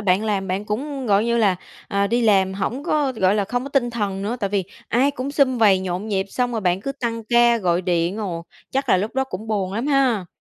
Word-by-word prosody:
bạn 200 +1 +2
làm 200 -3 -1
bạn 190 +3 -2
cũng 270 +5 -4
gọi 205 +1 +3
như 235 0 +1
là, 200 -5 +3 0.3
à, 200 0 +1
đi 235 +3 +1
làm 190 -4 +3
hổng 235 +8 -3
có, 295 -5 +1
gọi 190 -3 +2
là, 205 - +1
không 245 +5 -2
có - - -5
tinh 245 -4 +1
thần 200 -4 -2
nữa, 220 +5 -2
tại 200 - -1
vì 195 -2 0 0.2
ai 265 +4 +3
cũng 275 0 -4
sum 275 -3 +2
vầy 205 -4 +5
nhộn 185 +2 -3
nhịp 195 -2 0
xong 245 +2 -1
rồi 225 - -1
bạn 180 -1 +1
cứ 275 +6 -3
tăng 230 -4 -4
ca 240 0 +4
gọi 180 -3 +1
điện, 175 +1 0
ồ. 180 -6 -4 0.3
Chắc 270 +1 -1
là - - +5
lúc 205 +4 -3
đó 265 0 +1
cũng 215 -3 -7
buồn 195 -4 -1
lắm 230 +6 -2
ha? 260 -10 +2
215 Hz, 255 wpm, -22 LUFS, 190-245 Hz, 0.3 s, vầy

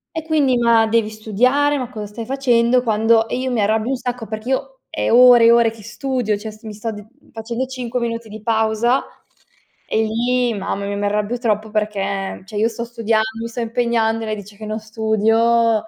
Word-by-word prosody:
E 320 - -3
quindi: 295 -5 +2
"Ma 230 -1 +4
devi 220 -1 +1
studiare! 250 +7 +1
Ma 250 -3 -4
cosa 215 -4 -6
stai 225 +3 -7
facendo?" 250 -1 +2
Quando 225 0 +2
e 245 - -3
io 260 0 -2
mi 235 -3 0
arrabbio 215 +3 +1
un - - +1
sacco 245 -1 -4
perché 215 +3 -6
io 265 0 -2
è - - -1
ore 245 0 +7
e 230 - +7
ore 235 -1 +5
che 220 -1 -14
studio. 235 -1 -2
Cioè, 215 +1 -7
s 215 0 -18
mi 215 -1 -7
sto 215 +2 -4
d 210 -1 -9 0.3
facendo 230 +3 -4
5 250 -1 -4
minuti 230 -1 -4
di 215 0 -9
pausa 225 +3 +1 0.9
e 220 - +1
lì 240 +2 0
mamma 200 0 -3
mia 200 0 -3
mi 205 - -2
arrabbio 210 +3 -1
troppo, 220 -3 -1
perché, 200 -2 -2
cioè, 205 +1 -7
io 215 +2 +3
sto 235 0 -5
studiando, 230 -2 0 0.2
mi 230 - -3
sto 230 +1 -7
impegnando 230 -1 0
e - - -4
lei 215 - -2
dice 205 0 -11
che 215 - -8
non 215 +1 -3
studio, 220 +1 +2
225 Hz, 210 wpm, -19 LUFS, 215-245 Hz, 0.9 s, ore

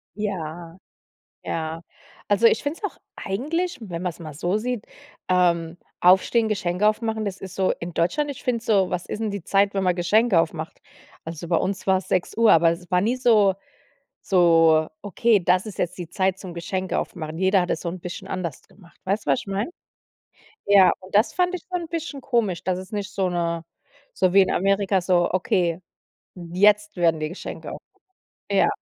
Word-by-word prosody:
Ja, 175 -5 -5 0.7
ja. 160 +1 -4 0.5
Also, 205 +3 +4
ich 225 - +3
finde 290 +4 -3
es - - -10
auch - - -24 0.2
eigentlich, 325 - -2
wenn 175 -6 -6
man's 180 -2 -3
mal 155 -3 -8
so 175 +6 -1
sieht, 240 0 -3 0.4
ähm 170 -2 +2 0.3
aufstehen, 190 +5 +4
Geschenke 200 0 +1
aufmachen, 220 -1 -1
das 195 -1 -5
ist 190 - -8
so 190 -1 +1
in 170 +1 -6
Deutschland 290 - 0
ich 275 - -8
finde 240 -2 0
es - - -17
so 200 -5 +3
was 180 -1 -3
ist 215 - -6
denn 220 - -1
die 200 -3 -5
Zeit, 200 +1 +2
wenn 195 - 0
man 180 - +2
Geschenke 185 +2 +3
aufmacht? 160 0 -4 0.4
Also, 165 +1 -7
bei 170 0 +1
uns 195 0 -3
war's 190 -1 +1
6:00, 220 +5 +2
aber 165 0 +5
es 175 +2 -6
war 180 0 +3
nie 235 +5 +1
so 215 -6 +4 0.7
so, 165 -4 +4
okay, 210 +2 +2
das 180 +3 +2
ist 210 - -9
jetzt 175 - -2
die 175 -3 -6
Zeit 190 +1 0
zum 185 -3 -9
Geschenke 185 +2 -2
aufmachen. 160 -2 -6
Jeder 190 +1 +3
hat 180 - -2
es - - -2
so 170 - -3
'n 180 +1 -7
bisschen 175 0 -7
anders 175 -6 -4
gemacht. 175 -5 -21
Weißt 200 +3 -1
du, 140 - +2
was 135 - +2
ich - - -11
meine? 200 - -2 1.0
Ja, 200 -2 +6
und 185 0 -14
das 215 - +3
fand 360 0 +1
ich - - -12
schon 360 -1 -2
'n 330 - -8
bisschen 320 -4 -5
komisch, 230 -10 0
dass 185 0 -1
es 185 +4 -10
nicht 205 -1 -3
so 190 -2 0
'ne 170 -1 -2 0.5
so 185 -1 +1
wie 195 - +7
in 190 - 0
Amerika 195 0 +2
so: 175 -1 +2
„Okay, 180 -2 0 0.5
jetzt 205 +4 +2
werden 165 -2 +2
die 155 - -2
Geschenke 180 - -7
aufgemacht." - - -13 0.6
Ja, - - +4
185 Hz, 195 wpm, -23 LUFS, 175-210 Hz, 1.0 s, wie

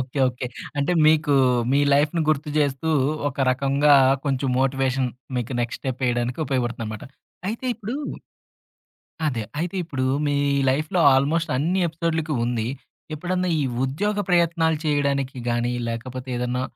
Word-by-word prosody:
Okay. 130 +2 -5
Okay. 125 0 -5 0.3
అంటే 145 +5 +1
మీకు 155 -1 +4 0.4
మీ 140 - +4
లైఫ్‌ని 150 +3 +2
గుర్తు 155 0 +1
జేస్తూ 145 +1 +1 0.4
ఒక 140 - -10
రకంగా 140 +2 +3 0.3
కొంచెం 135 -1 0
మోటివేషన్ 135 -1 +1 0.3
మీకు 120 +1 -3
నెక్స్ట్ 120 0 -3
స్టెప్ 130 0 -4
ఏయడానికి 120 0 -1
ఉపయోగపడుతుందనమాట. 120 -5 -3 0.4
అయితే 230 +4 -4
ఇప్పుడు 225 +2 -6 1.3
అదే 125 -7 -1 0.2
అయితే 175 +3 -2
ఇప్పుడు 130 -5 -3 0.2
మీ 145 0 +1 0.3
లైఫ్‌లో 155 +7 0
ఆల్‌మోస్ట్ 155 +5 +1
అన్ని 175 +7 +1
ఎపిసోడులకి 160 -1 -2
ఉంది. 120 -1 -1 0.5
ఎప్పుడన్నా 180 +3 -1
ఈ - - +1 0.2
ఉద్యోగ 205 +11 -1
ప్రయత్నాలు 170 -2 +2
చేయడానికి 140 -3 0
గాని, 120 +1 0 0.2
లేకపోతే 125 +3 -5
ఏదన్నా 125 +1 -1
140 Hz, 130 wpm, -23 LUFS, 130-160 Hz, 1.3 s, మీకు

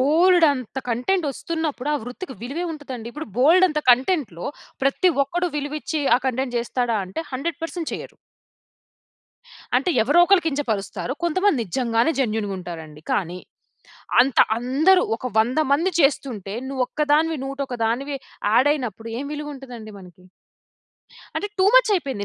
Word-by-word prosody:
బోలెడంత 305 - +3
కంటెంటొస్తున్నప్పుడు, 300 +1 -2
ఆ - - +2
వృత్తికి 265 +4 -7
విలువేం 330 +8 -3
ఉంటదండి. 255 -6 -7
ఇప్పుడు 300 +2 -6
బోలెడంత 320 +3 +5
కంటెంట్‌లో 250 - +1 0.4
ప్రతి 355 +7 +3
ఒక్కడు 350 +5 -1
విలువిచ్చి 295 +1 -3
ఆ - - -1
కంటెంట్ 255 -1 -1
జేస్తాడా 240 -1 -1
అంటే, 190 - -5
100% 330 +4 -4
చెయ్యరు. - - -7 1.6
అంటే 275 +8 +1
ఎవరోక‌ళ్ళు 350 - +5
కించపరుస్తారు. 255 -5 -2
కొంతమంది 370 -2 +2
నిజంగానే 230 - +1
జెన్యూన్‌గా 215 -5 -1
ఉంటారండి. 160 -4 -8
కానీ, 180 -2 -1 0.8
అంత, 255 0 +2 0.2
అందరు, 300 +10 +3
ఒక 255 - -6
100 245 +7 +2
మంది 335 +7 +2
చేస్తుంటే 245 - 0
నువ్వొక్కదానివి, 295 +4 +1
నూట 275 +1 -6
ఒక్కదానివి 245 +4 -1 0.4
యాడ్ 260 +5 +5
అయినప్పుడు 230 -5 -5
ఏం 280 - -4
విలువుంటదండి 270 -7 -8
మనకి? 180 -1 -16 1.1
అంటే 410 - -2
టూ 375 - +4
మచ్ - - +6
అయిపోయింది. 270 - -2
275 Hz, 120 wpm, -23 LUFS, 235-320 Hz, 1.6 s, మచ్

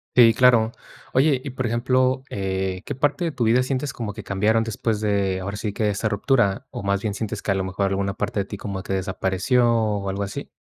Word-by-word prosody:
Sí, 115 -2 +8
claro. 115 -1 +4 0.4
Oye, 135 0 +4
y 140 - -6
por 130 0 -3
ejemplo, 130 +3 +1
eh, 95 -1 -2
¿qué 145 - -4
parte 145 +6 0
de 165 - 0
tu 120 -4 -1
vida 120 +3 +4
sientes 130 +1 -2
como 115 -3 -4
que 105 -1 -9
cambiaron 110 +3 +2
después 110 0 -1
de, 100 -3 0
ahora 100 +2 -4
sí, 105 0 -3
que 110 - -3
de 105 - +2
esa 105 +2 -1
ruptura? 120 +2 +1
¿O 120 -5 -7
más 100 0 0
bien 105 -2 -2
sientes 105 0 -4
que 100 - -1
a - - +2
lo 95 - 0
mejor 95 +1 -1
alguna 100 0 -1
parte 100 - -2
de 95 - -4
ti 100 - -7
como 100 -2 -5
que - - -6
desapareció, 95 +5 +1
o 105 -4 0
algo 100 +1 -2
así? 100 - -6
105 Hz, 235 wpm, -23 LUFS, 100-125 Hz, 0.4 s, Sí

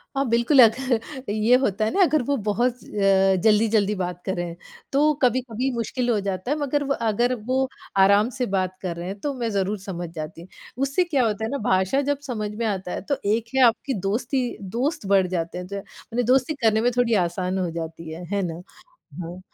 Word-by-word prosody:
अ, 275 - +2
बिल्कुल, 235 +5 +3
अगर 245 +1 +4 0.3
ये 215 +3 +4
होता 215 -5 0
है 220 - 0
ना 395 - +3
अगर 310 -3 +3
वो 285 - +3
बहुत 240 +4 +1
अ, 195 -1 +3
जल्दी-जल्दी 215 -1 +3
बात 180 -2 -4
करें 175 -3 -3 0.4
तो 295 +2 +4
कभी-कभी 250 0 +1
मुश्किल 240 +2 -2
हो 225 -3 +2
जाता 195 +4 -3
है, 295 - +1
मगर 290 0 0
व 275 - +2 0.2
अगर 240 +4 +1 0.2
वो 260 - +2 0.4
आराम 200 +3 +5
से 255 - 0
बात 185 -1 -1
कर 180 -3 -3
रहे 170 +1 -5
हैं 195 +2 -6
तो 285 +6 -2
मैं 240 -3 -2
ज़रूर 200 0 -1
समझ 175 -3 -6
जाती। 160 +2 -7 0.3
उससे 275 +6 +1
क्या 295 -7 +1
होता 215 -1 -1
है - - -3
ना 280 - -1
भाषा 190 +9 +2
जब 285 -1 0
समझ 215 -5 -3
में 230 +1 -2
आता 190 -4 -2
है - - -3
तो 280 - +2
एक 220 +3 +1
है 265 - +4
आपकी 240 +4 +1
दोस्ती 240 +6 0 0.3
दोस्त 265 -1 -1
बढ़ 190 -2 +4
जाते 175 -1 -3
हैं, 180 0 -6
ज 200 - -9
माने 235 +4 -5
दोस्ती 265 +3 +3
करने 220 0 +4
में 245 - +2
थोड़ी 235 -2 +3
आसान 180 +2 -2
हो 180 -2 -1
जाती 165 0 -6
है, 165 +3 -7
है 200 - +1
ना? 175 -2 -4 0.6
हाँ, 175 +2 -8
215 Hz, 210 wpm, -24 LUFS, 185-250 Hz, 0.6 s, आराम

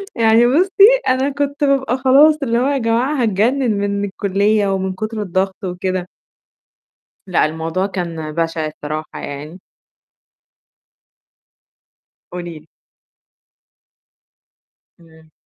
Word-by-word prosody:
يعني 230 0 +4
بُصّي، 385 - +5
أنا 260 +2 +2
كنت 285 +1 -3
بابقى 270 -3 +1
خلاص، 275 +4 +5
اللي 235 -3 0
هو 255 - +1
يا 285 0 +1
جماعة 240 +4 0
هاتجنن 230 +4 +1
من 200 0 -1
الكُلِّية، 200 +1 0
ومن 190 0 -2
كُتر 215 +2 -5
الضغط 190 0 -2
وكده. 185 0 -3 1.2
لأ، 180 - +2
الموضوع 160 +4 -2
كان 170 -5 -5
بشع 165 0 -2
الصراحة 155 0 -7
يعني. 150 +6 -8 2.7
قولي 175 -2 -7
لي. 155 - -24 2.3
إمم. 160 -1 -21
200 Hz, 100 wpm, -18 LUFS, 170-255 Hz, 2.7 s, بُصّي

